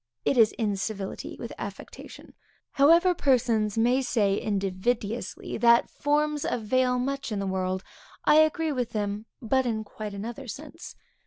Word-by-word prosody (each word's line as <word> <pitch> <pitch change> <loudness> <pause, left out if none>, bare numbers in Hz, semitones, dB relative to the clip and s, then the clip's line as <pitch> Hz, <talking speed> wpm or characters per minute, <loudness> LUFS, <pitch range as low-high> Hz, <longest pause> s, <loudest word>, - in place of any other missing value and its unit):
It - - +2
is 225 -3 +5
incivility 200 -2 -3
with - - -7
affectation. - - -9 0.4
However 335 +6 +5
persons 235 - +1
may 245 +4 +3
say 205 -6 +1
invidiously 205 +3 -2
that 235 0 +5
forms 295 0 0
avail 250 +2 +1
much 270 0 -3
in 210 - -2
the 195 - -2
world, 185 0 -2 0.4
I 300 - +6
agree 315 0 +3
with 250 -4 -2
them, 210 0 -3 0.2
but 260 +3 +1
in 220 -2 -1
quite 210 -1 -7
another 235 +6 -6
sense. 305 +7 -9
235 Hz, 140 wpm, -27 LUFS, 205-270 Hz, 0.4 s, I